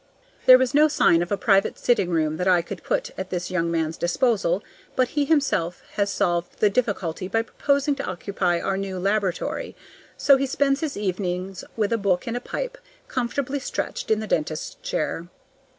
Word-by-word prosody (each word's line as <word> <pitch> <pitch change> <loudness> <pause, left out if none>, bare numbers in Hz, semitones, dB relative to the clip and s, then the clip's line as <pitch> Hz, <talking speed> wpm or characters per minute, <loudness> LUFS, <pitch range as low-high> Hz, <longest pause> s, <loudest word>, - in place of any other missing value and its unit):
There 255 - +11
was 260 +1 0
no 300 +2 +6
sign 170 - +4
of 175 - -3
a 200 - +1
private 195 -2 +2
sitting 200 -7 +2
room 155 -2 0
that 180 - -1
I 180 -2 +4
could - - -7
put - - -1
at - - -4
this 180 -1 -3
young 170 -2 0
man's 160 -1 -1
disposal, 195 0 +1 0.3
but 255 -1 +2
he 290 -1 0
himself 270 - +1
has 200 -1 0
solved 175 -2 -1
the 210 - +3
difficulty 195 -6 -1
by 225 +3 +1
proposing 280 +4 +1
to 275 - -3
occupy 180 -1 -1
our 195 +2 -1
new 195 -1 -4
laboratory. 195 -1 -1 0.4
So 275 -1 +5
he 275 +1 0
spends 275 +1 +1
his 310 -4 -3
evenings 185 -1 -3
with 215 0 +1
a 230 - +1
book 190 -3 +1
and 235 - -3
a 245 - -2
pipe, - - -5 0.3
comfortably 265 +3 -2
stretched 265 - -4
in 220 -1 +3
the - - -3
dentist's 155 -5 -2
chair. 165 +2 -2
200 Hz, 185 wpm, -24 LUFS, 175-255 Hz, 0.4 s, There